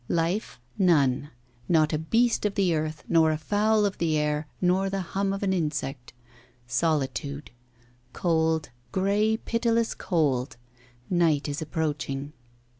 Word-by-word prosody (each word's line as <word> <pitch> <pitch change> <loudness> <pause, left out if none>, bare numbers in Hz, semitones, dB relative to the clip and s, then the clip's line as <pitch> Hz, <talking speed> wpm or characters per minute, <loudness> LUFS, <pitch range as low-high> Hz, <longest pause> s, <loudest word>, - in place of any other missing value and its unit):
Life 170 0 -1 0.2
none; 145 -7 +3 0.4
not 155 -2 +3
a 155 - +1
beast 230 +9 +2
of 200 - -6
the 190 -4 +2
earth, 155 -1 -2
nor 160 -1 +4
a 155 - 0
fowl 210 +6 +2
of 200 - -2
the 160 -2 +1
air, 150 0 -1
nor 185 +2 +2
the 195 0 -2
hum 195 0 +1
of 195 +1 -3
an 190 -1 +1
insect. 145 -7 -3 0.5
Solitude. 140 +2 -1 0.6
Cold 160 -1 0 0.2
grey, 205 +3 +2
pitiless 230 0 0
cold. 140 - 0 0.5
Night 165 -5 +2
is 145 +1 -3
approaching. 150 -2 -3
160 Hz, 130 wpm, -26 LUFS, 150-195 Hz, 0.6 s, nor